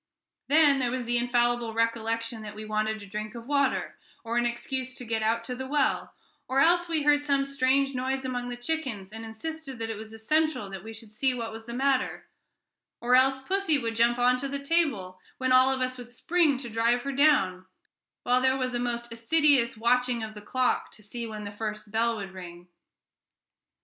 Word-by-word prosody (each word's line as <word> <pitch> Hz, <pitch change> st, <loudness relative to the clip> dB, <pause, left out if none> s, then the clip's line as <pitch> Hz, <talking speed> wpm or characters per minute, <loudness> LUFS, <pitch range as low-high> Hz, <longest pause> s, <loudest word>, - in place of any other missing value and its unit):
Then 290 Hz, -2 st, +5 dB
there 250 Hz, -2 st, +1 dB
was 250 Hz, 0 st, -3 dB
the 240 Hz, +1 st, +1 dB
infallible 240 Hz, -1 st, +1 dB
recollection 230 Hz, 0 st, -1 dB
that 210 Hz, -1 st, -8 dB
we 215 Hz, 0 st, -7 dB
wanted 215 Hz, 0 st, -1 dB
a -, -, -9 dB
drink 215 Hz, +3 st, -6 dB
of 230 Hz, -1 st, -8 dB
water, 280 Hz, -1 st, 0 dB, 0.3 s
as 230 Hz, +1 st, -3 dB
an 240 Hz, -, +2 dB
excuse 255 Hz, +2 st, -4 dB
to 250 Hz, -, -7 dB
get 225 Hz, -1 st, -1 dB
out 225 Hz, +1 st, +1 dB
to 250 Hz, -, -4 dB
the 260 Hz, +1 st, -5 dB
well; 285 Hz, 0 st, 0 dB, 0.3 s
or 265 Hz, +1 st, +1 dB
else 345 Hz, +3 st, +4 dB
we 315 Hz, -3 st, +1 dB
heard 290 Hz, 0 st, +4 dB
some 280 Hz, -1 st, +1 dB
strange 275 Hz, 0 st, +1 dB
noise 265 Hz, +1 st, -2 dB
among 245 Hz, -1 st, -3 dB
the 245 Hz, -, -5 dB
chickens, 245 Hz, -8 st, -3 dB
and 225 Hz, 0 st, -7 dB
insisted 270 Hz, +5 st, -6 dB
that 225 Hz, 0 st, -3 dB
it 220 Hz, -, -5 dB
was 220 Hz, 0 st, -9 dB
essential 225 Hz, -1 st, 0 dB
that 190 Hz, -2 st, -7 dB
we 225 Hz, -, -8 dB
should 225 Hz, -1 st, -11 dB
see 255 Hz, +3 st, +1 dB
what 230 Hz, -2 st, -4 dB
was 225 Hz, 0 st, -9 dB
the 235 Hz, +1 st, -6 dB
matter; 265 Hz, 0 st, 0 dB, 0.7 s
or 245 Hz, +1 st, +1 dB
else 265 Hz, +1 st, +4 dB
pussy 380 Hz, -3 st, +1 dB
would 230 Hz, -4 st, -3 dB
jump 235 Hz, +1 st, +3 dB
on 250 Hz, +1 st, +3 dB
to 275 Hz, -, -3 dB
the 280 Hz, +1 st, -3 dB
table, 280 Hz, -, 0 dB, 0.2 s
when 260 Hz, 0 st, -1 dB
all 255 Hz, +1 st, +6 dB
of 265 Hz, -1 st, 0 dB
us 255 Hz, 0 st, -2 dB
would 240 Hz, -1 st, -9 dB
spring 305 Hz, +3 st, +2 dB
to 260 Hz, -1 st, -6 dB
drive 235 Hz, +2 st, +2 dB
her 275 Hz, -, -2 dB
down; 195 Hz, -11 st, +3 dB, 0.6 s
while 250 Hz, +1 st, +2 dB
there 260 Hz, 0 st, +3 dB
was 255 Hz, -1 st, -2 dB
a 240 Hz, -, -1 dB
most 235 Hz, -1 st, -3 dB
assiduous 260 Hz, 0 st, +3 dB
watching 245 Hz, +1 st, +1 dB
of 215 Hz, 0 st, -6 dB
the 210 Hz, -, -10 dB
clock 255 Hz, +4 st, 0 dB
to 210 Hz, -, -15 dB
see 235 Hz, +3 st, -6 dB
when 215 Hz, -1 st, -7 dB
the 205 Hz, -, -6 dB
first 210 Hz, 0 st, -5 dB
bell 230 Hz, +1 st, +1 dB
would 195 Hz, -3 st, -6 dB
ring. 175 Hz, -1 st, -10 dB
245 Hz, 210 wpm, -27 LUFS, 225-270 Hz, 0.7 s, all